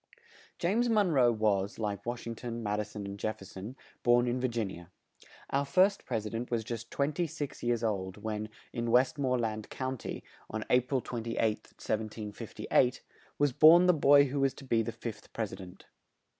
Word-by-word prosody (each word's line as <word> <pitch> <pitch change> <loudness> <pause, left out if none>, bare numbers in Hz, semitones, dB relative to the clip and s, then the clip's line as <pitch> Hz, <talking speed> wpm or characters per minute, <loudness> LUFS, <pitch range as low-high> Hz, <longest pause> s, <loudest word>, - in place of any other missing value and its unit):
James 220 +8 +1
Mon 210 -5 +3
roe 125 -5 +5
was, 105 -3 0
like 105 -1 -3
Wash 120 0 -3
ing 115 - -3
ton, 115 0 -6
Mad 105 0 -1
i - - +2
son 105 -1 -7
and 100 0 -6
Jef 110 +1 -2
fer 95 - -12
son, 100 +7 -8 0.3
born 120 0 +4
in 125 +1 0
Vir 130 - +2
gin 115 -5 -2
i - - -8
a. 85 - -13 0.7
Our 140 +1 +2
first 190 +7 +3
Pres 110 -4 -2
i - - -3
dent 115 +2 -4
was 115 -2 0
just 115 0 -6
twen 140 +2 0
ty 170 +3 0
six 150 -2 -6
years 120 -1 0
old 95 -4 -2
when, 110 0 -4 0.2
in 120 0 -2
West 130 +5 +3
more 130 -2 +1
land 110 -2 -3
County, 130 -2 -4 0.3
on 110 0 -3
A 125 - +7
pril 130 0 -2
28th, 115 -1 -4 0.4
1758, 110 +3 -1 0.3
was 145 -3 +2
born 165 +6 +8
the 180 - +6
boy 145 -2 +6
who 140 +1 -2
was 135 -1 +2
to - - -11
be 115 -4 +2
the 115 - -3
fifth 115 -2 -8
Pres 110 -4 -3
i - - -6
dent. 90 -2 -12
120 Hz, 210 wpm, -31 LUFS, 110-135 Hz, 0.7 s, born